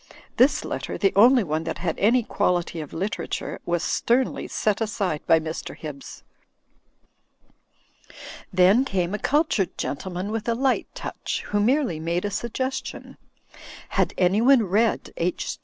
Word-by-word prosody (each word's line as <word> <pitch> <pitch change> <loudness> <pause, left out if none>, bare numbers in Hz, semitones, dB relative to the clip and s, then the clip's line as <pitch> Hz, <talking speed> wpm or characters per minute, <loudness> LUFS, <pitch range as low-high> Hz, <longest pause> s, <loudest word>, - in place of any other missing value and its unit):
This 260 +4 +4
letter - - -4
(the 195 - +2
only 240 +4 +6
one 155 -2 -2
that 165 - -3
had 170 -2 -2
any 235 +4 +4
quality 175 -5 -1
of 150 - -9
literature) 195 +6 -4
was 175 -1 0
sternly 250 +2 0
set 215 0 -1
aside 200 -8 -1
by 165 - +6
Mr. 160 0 -6
Hibbs. 145 -3 -9 2.3
Then 185 +7 +5
came 185 -7 -1
a 210 - -2
cultured 290 - +1
gentleman 185 +6 -4
with 225 +1 -3
a 230 - +1
light 265 +2 +1
touch, - - -4
who 205 - +1
merely 240 - +1
made 170 +4 -1
a 205 - -2
suggestion. 260 +5 -4 0.7
Had - - 0
anyone 225 +8 +4
read 215 +4 0
H. 175 +1 -2
200 Hz, 140 wpm, -24 LUFS, 175-235 Hz, 2.3 s, only